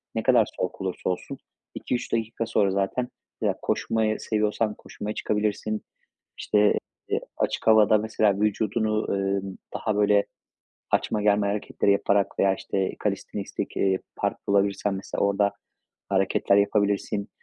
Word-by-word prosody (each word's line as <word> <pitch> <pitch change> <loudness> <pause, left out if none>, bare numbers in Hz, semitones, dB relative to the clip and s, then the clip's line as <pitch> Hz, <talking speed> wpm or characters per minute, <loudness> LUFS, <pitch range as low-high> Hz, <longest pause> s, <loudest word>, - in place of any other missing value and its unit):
ne - - -1
kadar - - +5
soğuk - - -3
olursa 95 0 -2
olsun 90 - -4 0.4
2-3 125 - -3
dakika 115 0 -1
sonra 100 -3 +2
zaten 100 +6 0 0.3
ya, - - +1
koşmayı 110 -1 0
seviyorsan 105 0 0
koşmaya 105 +1 -6
çıkabilirsin. 105 0 -1 0.6
İşte, 105 0 +3 0.4
eee, - - +1 0.2
açık - - -1
havada, 110 -1 +6
mesela, 105 -2 +1
vücudunu, 110 0 0
emm, 95 0 -2 0.2
daha, 110 - -1
böyle, 105 0 +4 0.7
açma, 105 - +1
germe 105 0 +3
hareketleri 100 0 +1
yaparak 100 0 +1
veya, 95 -1 +4
işte, 95 0 -2
kalistenistik, - - -3
eee, 95 -1 +2 0.2
park - - -1
bulabilirsen, 100 0 +2
mesela, 95 - -4
orada 100 0 +2 0.6
hareketler 95 0 +2
yapabilirsin. 100 0 +1
105 Hz, 125 wpm, -26 LUFS, 100-110 Hz, 0.7 s, havada